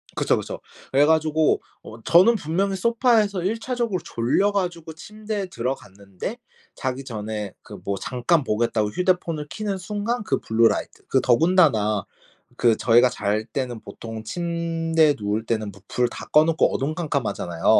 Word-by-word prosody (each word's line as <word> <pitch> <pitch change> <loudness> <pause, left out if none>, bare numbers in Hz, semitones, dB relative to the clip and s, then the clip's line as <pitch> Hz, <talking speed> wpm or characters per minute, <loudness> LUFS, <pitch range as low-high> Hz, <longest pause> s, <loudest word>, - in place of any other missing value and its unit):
그쵸, - - +2
그쵸. - - -5 0.3
그래 140 +2 +5
가지고 160 0 +2 0.2
어 110 +1 -11
저는 185 - +5
분명히 195 +2 -1
소파에서 220 -3 +2
일차적으로 225 -2 -1
졸려 130 - +1
가지고 175 -5 -3
침대에 210 +3 -5
들어갔는데 100 - -5 0.4
자기 130 0 -3
전에 105 -4 -5
그 - - -11
뭐 100 - -1
잠깐 130 +5 +1
보겠다고 110 -2 0
휴대폰을 170 - -1
켜는 205 -3 -3
순간 210 +5 -3
그 - - 0
블루라이트 115 0 +1
그 130 - +2
더군다나 120 - +3 0.5
그 115 -3 +3
저희가 120 +1 +5
잘 105 -2 -1
때는 125 -3 -4
보통 115 -1 -8
침대에 165 0 +1
누울 105 +2 -2
때는 110 -3 -2
부 100 0 -17
불 125 -1 0
다 - - -8
꺼 150 - +7
놓고 160 -1 +2
어두컴컴하잖아요. 135 - -2
150 Hz, 330 characters per minute, -23 LUFS, 115-185 Hz, 0.5 s, 꺼